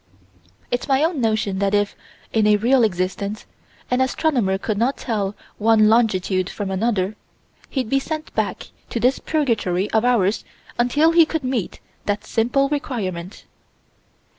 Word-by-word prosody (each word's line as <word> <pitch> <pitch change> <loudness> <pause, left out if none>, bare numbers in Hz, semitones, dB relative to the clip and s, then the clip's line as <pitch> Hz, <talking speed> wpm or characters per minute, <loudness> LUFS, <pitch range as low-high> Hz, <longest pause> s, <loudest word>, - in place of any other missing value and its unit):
It's 245 - -1
my 270 +1 +3
own 325 -4 0
notion 215 -4 0
that 200 0 +1
if, 205 0 0 0.4
in 220 -2 +3
a 210 - +6
real 245 +4 +3
existence, 200 +1 -2 0.5
an 250 +1 +2
astronomer 255 -7 +1
could 205 +1 -2
not 255 +4 +1
tell 205 -4 -2 0.2
one 215 0 +5
longitude 195 -5 +2
from 200 -2 -4
another, 200 0 0 0.5
he'd 260 -5 -2
be 275 +4 +2
sent 310 +2 -5
back - - -2 0.2
to 235 - -2
this 250 +3 +2
purgatory 220 - 0
of 220 0 +2
ours 225 -5 +2 0.4
until 290 +7 +3
he 335 0 +7
could 320 -1 -2
meet 255 -7 -3 0.3
that 205 +1 -1
simple 245 +6 +1
requirement. 210 - -4
225 Hz, 145 wpm, -21 LUFS, 200-260 Hz, 0.5 s, he